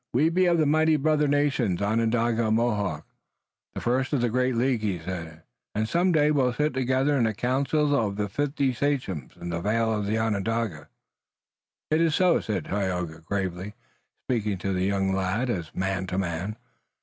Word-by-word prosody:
"We 145 +7 +3
be 180 +2 +2
of 170 -1 +3
the 155 - +3
mighty 155 +2 +3
brother 150 0 +2
nations, 140 -10 +1
Onondaga 115 +2 +1
and 110 - +2
Mohawk, 105 -9 -1 0.7
the - - -4
first 130 +4 0
of 135 - +2
the 120 -2 +1
great 125 +1 +1
League," 120 -1 +1
he 100 -4 -1
said, 80 -2 -7 0.3
"and 110 +1 0
some 175 +7 +2
day 150 -2 +3
we 145 -2 +2
will 125 -1 +1
sit 150 +4 0
together 130 +3 +1
in 120 - +3
the 110 -1 -1
councils 140 +5 +1
of 110 -7 +1
the 105 0 -1
fifty 140 +4 0
sachems 120 - -2
in 85 - -6
the 85 0 -3
vale 110 +3 +1
of 105 -2 -2
Onondaga." 110 -4 -1 1.0
"It 155 +1 +3
is 165 -2 +2
so," 180 -2 +4
said 105 -3 -3
Tayoga 90 -5 -2
gravely, 95 +3 -4 0.5
speaking 105 -5 0
to 95 +1 -2
the 90 0 0
young 95 -1 +1
lad 95 +7 0
as 85 -7 -3
man 95 0 -1
to 90 - -3
man. 95 +3 -2
115 Hz, 185 wpm, -26 LUFS, 95-140 Hz, 1.0 s, so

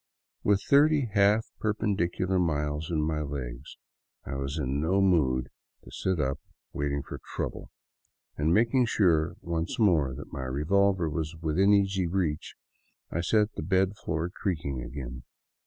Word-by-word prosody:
With 100 0 +2
thirty 145 -2 +4
half 105 +2 +4
perpendicular 95 -3 0
miles 75 -2 -1
in 80 -3 0
my 75 0 -1
legs 70 -3 -6 0.5
I 65 - -5
was 70 +3 -3
in 70 -1 -1
no 90 +5 +2
mood 70 -10 +2 0.3
to - - -13
sit 95 -3 -1
up 70 -1 -1 0.3
waiting 70 0 -2
for - - -8 0.2
trouble, - - -4 0.7
and 75 +2 +1
making 120 +5 +3
sure 85 -7 +2
once 85 +1 -3
more 80 - +3
that - - -10
my 65 - -4
revolver 90 +7 +2
was 80 +1 -3
within 80 +5 +2
easy 95 -2 +2
reach, 85 -4 -2 0.6
I 85 - -1
set 105 +4 +2
the - - -5
bed 95 +4 +1
floor 80 -1 -3
creaking 80 - -3
again. 65 0 -7
85 Hz, 145 wpm, -28 LUFS, 75-100 Hz, 0.7 s, thirty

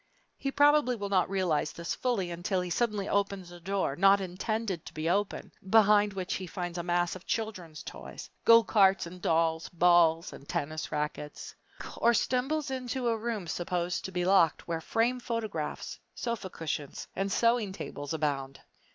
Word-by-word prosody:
He 275 - -3
probably 290 -2 +4
will 200 -3 -4
not 185 -3 +2
realize 180 -6 0
this 170 +1 -4
fully 210 -9 -1
unless 180 +2 -1
he 180 - -5
suddenly 210 -1 0
opens 200 -3 -1
a 175 - -11
door, 190 -5 -1
not 195 +4 +5
intended 190 0 -3
to - - -11
be 155 +1 -2
opened, 200 +4 -1 0.2
behind 210 -1 +5
which 185 -1 -3
he 185 - -4
finds 175 -1 -4
a - - -3
mass 175 0 0
of 185 - -12
children's 185 -9 -4
toys - - -9 0.2
go 230 0 +8
carts 195 -4 +4
and 180 +1 -10
dolls, 160 -1 +1
balls 170 -1 +4
and 140 - -13
tennis 155 +2 -3
rackets 150 0 -4 0.4
or 235 +1 +4
stumbles 270 +5 0
into 255 -1 -2
a 230 - +2
room 225 -3 -3
supposed 175 +1 -2
to 190 - -5
be 180 -1 -1
locked 185 -4 +3
where 165 -1 -2
framed 240 +7 0
photographs, 220 -11 -4 0.2
sofa 230 -5 -3
cushions, 155 -4 -5
and 195 0 -1
sewing 230 -2 +2
tables 145 -6 -6
abound! 140 -4 -2
190 Hz, 170 wpm, -30 LUFS, 170-220 Hz, 0.4 s, go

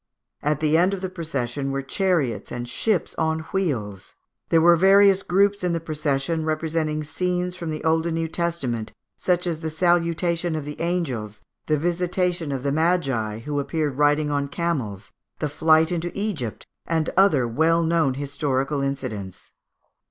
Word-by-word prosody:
At 150 0 0
the 155 +1 +3
end 185 +3 +3
of 190 - -8
the 190 -1 -4
procession 140 -6 -3
were 135 0 -2
chariots 165 - 0
and 120 0 -4
ships 190 - 0
on 160 0 0
wheels. 115 - -2 0.3
There 165 - +5
were 170 +1 +6
various 195 +2 +6
groups 200 +2 +2
in 180 -1 +1
the 165 - 0
procession 155 0 -1
representing 155 -1 -1
scenes 180 +3 -2
from 170 -3 -5
the 155 -1 -4
Old 160 +1 +2
and 165 - -1
New 165 0 -1
Testament, 155 -10 -2 0.2
such 180 -1 0
as 165 -3 -2
the 160 -1 -3
Salutation 170 0 +1
of 155 -2 -4
the 150 +2 -7
Angels, 125 - -2 0.2
the 155 - +2
Visitation 175 0 -1
of 135 -2 -3
the 140 - 0
Magi, 135 -10 0
who 145 +4 -2
appeared 145 -1 -2
riding 150 0 +3
on 140 -1 0
camels, 135 - -3 0.3
the 150 - -1
Flight 160 +2 +3
into 175 0 -2
Egypt, 185 - -3 0.2
and 160 -2 0
other 170 -11 +4
well 160 +7 +2
known 160 -5 +2
historical 140 0 -1
incidents. 130 -9 -5
160 Hz, 160 wpm, -24 LUFS, 140-175 Hz, 0.3 s, were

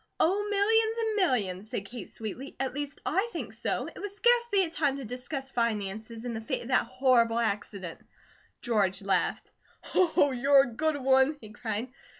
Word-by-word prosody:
"Oh, 400 +5 +2
millions 440 +2 +3
and 445 -2 0
millions," 215 - 0
said 200 - -4
Kate, 230 0 -8
sweetly, 230 +5 -7
"at 265 -1 -1
least 290 0 -5
I 390 +7 +1
THINK - - -5
so. - - -2
It - - -10
was 410 -1 -6
scarcely 475 -2 +4
a 330 - -3
time 290 -6 0
to 275 - -6
discuss 265 +3 -6
finances, 225 0 -2
in 240 - -3
the 220 - -4
face 220 - -2
of - - -9
that 255 - +3
horrible 250 -2 +3
accident." 200 -5 -2 0.6
George 200 -5 +1
laughed. 195 0 0 0.4
"Oh, 335 -5 +4
you're 270 +2 +5
a 245 - -6
good 310 +4 0
one!" 265 +2 +3
he 215 -4 -12
cried. 220 +3 -4
260 Hz, 175 wpm, -29 LUFS, 225-320 Hz, 0.6 s, you're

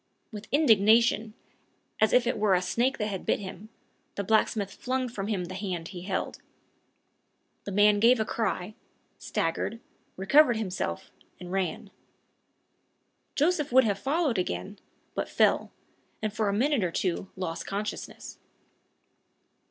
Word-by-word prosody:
With 210 -1 -8
indignation, 225 -4 +4 0.6
as 220 - +4
if 250 -1 +4
it 240 - -1
were 205 -3 +4
a 180 - +2
snake 245 +8 0
that 210 - -1
had 190 -3 -4
bit - - +1
him, 200 +1 -9 0.5
the 200 - -2
blacksmith 205 -1 +1
flung 255 0 -2
from 205 -5 -5
him 195 -5 -1
the 185 - -8
hand 185 -4 -4
he 180 - -8
held. 190 +2 -3 1.3
The 200 - -4
man 205 +1 +4
gave 235 +3 +5
a 220 - +1
cry, 210 -3 -2 0.5
staggered, 165 +7 -2 0.4
recovered 240 +6 +5
himself, 185 - -4 0.3
and 180 0 -8
ran. 195 +2 -2 1.4
Joseph 300 -1 +1
would 260 +1 +6
have 205 -3 0
followed 280 - 0
again, 90 - -4 0.3
but - - -3
fell, - - +2 0.5
and 215 -1 -3
for 215 -1 0
a - - +1
minute 250 +3 +1
or 175 - 0
two 185 +2 -2
lost 175 -3 -4
consciousness. 210 +2 -5
210 Hz, 140 wpm, -28 LUFS, 190-235 Hz, 1.4 s, would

